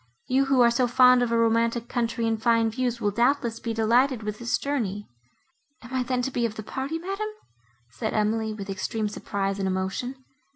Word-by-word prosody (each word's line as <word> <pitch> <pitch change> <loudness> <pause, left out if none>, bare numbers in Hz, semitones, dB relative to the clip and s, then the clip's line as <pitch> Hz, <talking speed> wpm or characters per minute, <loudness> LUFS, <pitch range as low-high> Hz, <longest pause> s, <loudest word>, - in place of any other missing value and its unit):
—You, 265 +2 +2
who 270 -2 +3
are 235 -1 +6
so 245 +1 +2
fond 250 +1 +6
of 240 -1 0
a 230 - +2
romantic 230 +1 +1
country 230 -1 -1
and 225 -1 -1
fine 230 -1 +3
views, 245 0 -2
will 205 -3 0
doubtless 235 +1 +1
be 230 - -3
delighted 230 +2 +2
with 210 0 -4
this 235 0 0
journey." 210 -8 -3 0.8
"Am 245 +2 -11
I 260 - +1
then 250 0 -1
to 270 - -2
be 245 - -1
of 225 -2 -1
the 215 - -6
party, 270 +8 -4
madam?" 390 +5 -4 0.6
said 220 - -3
Emily, 220 +1 0
with 205 -2 -7
extreme 205 +3 -2
surprise 200 -1 -3
and 195 - 0
emotion. 190 +7 -2
230 Hz, 200 wpm, -26 LUFS, 215-250 Hz, 0.8 s, are